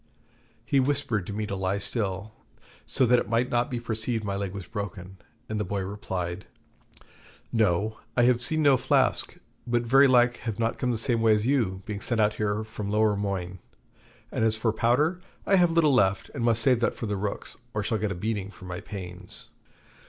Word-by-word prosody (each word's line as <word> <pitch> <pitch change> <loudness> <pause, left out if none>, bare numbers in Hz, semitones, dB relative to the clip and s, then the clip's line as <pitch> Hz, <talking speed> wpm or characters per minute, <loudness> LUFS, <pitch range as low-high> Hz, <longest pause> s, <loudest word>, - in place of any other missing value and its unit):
He 140 - +2
whispered 130 -8 0
to 105 - -5
me 105 +1 -2
to 100 - -4
lie 95 +1 -1
still, 100 -1 -3 0.5
so 130 - +2
that 125 0 +5
it - - -4
might 115 +2 +1
not 120 0 +1
be 125 - -3
perceived 115 0 -2
my 100 -1 -2
leg 100 -1 -3
was 100 -1 -7
broken; 95 -3 -6 0.3
and 110 -1 -3
the - - 0
boy 100 -1 -2
replied: 95 -2 -4 1.1
'No, 110 -1 +1 0.2
I 120 - +5
have 120 0 +4
seen 155 +5 +2
no 140 -3 +6
flask; 130 +1 +1 0.3
but 120 0 +1
very 135 +4 +6
like 125 -1 +4
have 110 -4 -4
not 115 0 -1
come 125 - 0
the 120 - 0
same 115 0 +1
way 110 -1 +5
as 105 +1 -1
you, 110 -9 0
being 105 -3 -5
sent 120 +1 -1
out 105 0 +3
here 105 0 0
from 105 -2 -6
Lowermoigne; 100 -4 0 0.7
and - - -1
as 110 -1 +4
for 110 -1 0
powder, 145 +11 +2 0.2
I 195 - +4
have 175 -1 +5
little 165 -3 +3
left, 95 -6 +2
and 120 - -3
must 115 -1 +2
save 125 -2 +4
that 120 - 0
for - - -5
the 105 -1 -2
rooks, 100 +1 -4 0.2
or 105 - 0
shall 110 +1 -1
get 105 -1 -1
a - - -3
beating 100 +1 -3
for 95 - -13
my 90 -1 -5
pains.' 90 -2 -8
110 Hz, 205 wpm, -27 LUFS, 100-120 Hz, 1.1 s, no